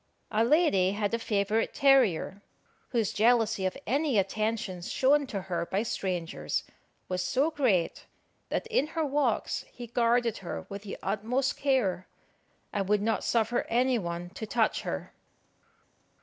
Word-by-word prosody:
A 220 Hz, +1 st, +3 dB
lady 230 Hz, -, +3 dB
had 205 Hz, +1 st, -1 dB
a 230 Hz, -, +1 dB
favourite 215 Hz, 0 st, 0 dB
terrier, 240 Hz, -, +3 dB, 0.5 s
whose 230 Hz, -5 st, 0 dB
jealousy 225 Hz, -3 st, +3 dB
of 185 Hz, -, -4 dB
any 280 Hz, -2 st, +1 dB
attentions 200 Hz, -2 st, -1 dB
shown 280 Hz, +2 st, +3 dB
to 200 Hz, -5 st, -4 dB
her 175 Hz, -2 st, -3 dB
by 195 Hz, +3 st, 0 dB
strangers 175 Hz, -, -2 dB, 0.4 s
was 180 Hz, 0 st, -1 dB
so 265 Hz, -, +1 dB
great, 240 Hz, -, 0 dB, 0.4 s
that -, -, -1 dB
in 285 Hz, -, +1 dB
her 320 Hz, -, +2 dB
walks 275 Hz, -5 st, 0 dB
he 245 Hz, -, -8 dB
guarded 235 Hz, 0 st, +1 dB
her 180 Hz, -, -6 dB
with 200 Hz, 0 st, -6 dB
the 205 Hz, -1 st, -7 dB
utmost 230 Hz, +7 st, 0 dB
care, 245 Hz, -10 st, 0 dB, 0.7 s
and 195 Hz, -2 st, -1 dB
would 210 Hz, -1 st, +3 dB
not 225 Hz, 0 st, 0 dB
suffer 230 Hz, +1 st, +1 dB
any 245 Hz, +1 st, +2 dB
one 175 Hz, -1 st, -5 dB
to 220 Hz, +2 st, -6 dB
touch 225 Hz, 0 st, +1 dB
her. -, -, -5 dB
220 Hz, 145 wpm, -29 LUFS, 195-245 Hz, 0.7 s, A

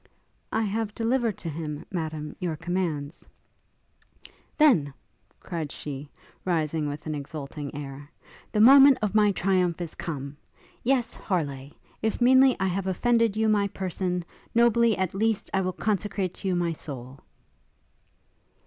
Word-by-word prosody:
'I 225 Hz, -, +1 dB
have 215 Hz, +1 st, -2 dB
delivered 230 Hz, -2 st, 0 dB
to -, -, -7 dB
him, 150 Hz, -1 st, -5 dB
Madam, 155 Hz, -4 st, -4 dB
your 175 Hz, -3 st, -2 dB
commands.' 165 Hz, -3 st, -3 dB, 1.3 s
'Then,' 220 Hz, -, +4 dB, 0.5 s
cried 165 Hz, -5 st, -5 dB
she, 140 Hz, 0 st, -7 dB, 0.3 s
rising 160 Hz, -3 st, 0 dB
with 145 Hz, +1 st, -6 dB
an 155 Hz, -, -2 dB
exulting 145 Hz, 0 st, -6 dB
air, 145 Hz, 0 st, -7 dB, 0.4 s
'the 210 Hz, -, +2 dB
moment 275 Hz, +3 st, +9 dB
of 210 Hz, -, 0 dB
my 210 Hz, -1 st, +5 dB
triumph 180 Hz, -2 st, +1 dB
is 170 Hz, -3 st, -5 dB
come! 140 Hz, -3 st, -5 dB, 0.5 s
Yes, 250 Hz, -1 st, +1 dB
Harleigh! 140 Hz, -7 st, -3 dB, 0.3 s
if 220 Hz, 0 st, -1 dB
meanly 260 Hz, +1 st, +6 dB
I 190 Hz, -, +1 dB
have 190 Hz, +1 st, -1 dB
offered 230 Hz, +2 st, +2 dB
you 220 Hz, 0 st, +2 dB
my 205 Hz, -2 st, +3 dB
person, 185 Hz, -2 st, -3 dB, 0.3 s
nobly, 235 Hz, -2 st, +4 dB
at 190 Hz, -2 st, -1 dB
least, 220 Hz, +1 st, 0 dB
I 190 Hz, -, +2 dB
will 185 Hz, 0 st, -1 dB
consecrate 200 Hz, -2 st, -1 dB
to 195 Hz, -, -6 dB
you 185 Hz, -, +1 dB
my 175 Hz, -1 st, 0 dB
soul!' 135 Hz, -4 st, -8 dB
180 Hz, 140 wpm, -26 LUFS, 150-215 Hz, 1.3 s, moment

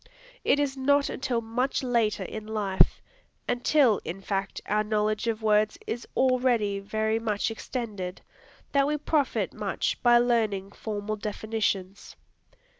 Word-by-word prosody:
It 285 Hz, -, +3 dB
is 280 Hz, -2 st, 0 dB
not 280 Hz, +2 st, +2 dB
until 245 Hz, -3 st, -1 dB
much 250 Hz, +5 st, -1 dB
later 235 Hz, -4 st, +1 dB
in 215 Hz, -1 st, -7 dB
life, 205 Hz, -3 st, +2 dB, 0.4 s
until 245 Hz, -2 st, +3 dB
in 175 Hz, +4 st, -5 dB
fact 195 Hz, 0 st, -3 dB
our 210 Hz, +1 st, +1 dB
knowledge 215 Hz, +1 st, 0 dB
of 225 Hz, -1 st, -1 dB
words 210 Hz, 0 st, +3 dB
is 235 Hz, +2 st, -4 dB
already 245 Hz, -6 st, +2 dB
very 220 Hz, +2 st, -1 dB
much 220 Hz, -1 st, -1 dB
extended, 210 Hz, -6 st, -5 dB, 0.5 s
that 280 Hz, -1 st, +3 dB
we 300 Hz, +1 st, 0 dB
profit 295 Hz, -2 st, 0 dB
much -, -, -2 dB
by 240 Hz, -1 st, +6 dB
learning 220 Hz, -5 st, +1 dB
formal 215 Hz, 0 st, -4 dB
definitions. 210 Hz, -2 st, -3 dB
220 Hz, 130 wpm, -27 LUFS, 210-245 Hz, 0.5 s, by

